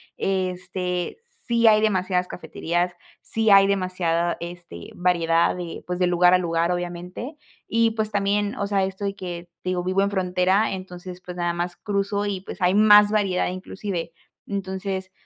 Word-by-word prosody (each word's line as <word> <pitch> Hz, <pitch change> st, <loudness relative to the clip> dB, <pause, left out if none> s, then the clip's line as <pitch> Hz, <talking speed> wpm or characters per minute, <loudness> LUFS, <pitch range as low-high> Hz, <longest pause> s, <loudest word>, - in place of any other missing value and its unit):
Este, 180 Hz, -, -2 dB, 0.3 s
sí 235 Hz, -1 st, +3 dB
hay 215 Hz, -1 st, +6 dB
demasiadas 185 Hz, -3 st, +1 dB
cafeterías. 175 Hz, +1 st, -2 dB, 0.3 s
Sí, 225 Hz, -1 st, 0 dB
hay 195 Hz, 0 st, +7 dB
demasiada, 185 Hz, -3 st, 0 dB
este, 170 Hz, -, -9 dB
variedad 170 Hz, -2 st, +2 dB
de, 175 Hz, -2 st, -6 dB
pues, 180 Hz, 0 st, -3 dB
de 180 Hz, -, +3 dB
lugar 175 Hz, 0 st, +5 dB
a 185 Hz, -, +7 dB
lugar, 170 Hz, 0 st, 0 dB
obviamente. 180 Hz, -, -5 dB, 0.3 s
Y 230 Hz, 0 st, +2 dB
pues 220 Hz, -1 st, -2 dB
también, 205 Hz, 0 st, 0 dB
o 200 Hz, -, -2 dB
sea, 195 Hz, -2 st, +1 dB
esto 190 Hz, +1 st, -6 dB
de 200 Hz, 0 st, -2 dB
que 175 Hz, -2 st, -7 dB
te 185 Hz, -, -1 dB
digo, 180 Hz, -1 st, -1 dB
vivo 185 Hz, +2 st, +1 dB
en 200 Hz, +1 st, +1 dB
frontera, 185 Hz, +2 st, +2 dB
entonces 180 Hz, -1 st, -8 dB
pues 180 Hz, -1 st, -8 dB
nada 175 Hz, -1 st, 0 dB
más 175 Hz, +1 st, -3 dB
cruzo 200 Hz, 0 st, -1 dB
y 200 Hz, -2 st, -2 dB
pues 190 Hz, 0 st, -10 dB
hay 180 Hz, +1 st, +3 dB
más 210 Hz, 0 st, +7 dB
variedad, 195 Hz, -4 st, +1 dB
inclusive. 185 Hz, -2 st, -5 dB, 0.3 s
Entonces 190 Hz, -1 st, -4 dB
185 Hz, 165 wpm, -24 LUFS, 175-200 Hz, 0.3 s, hay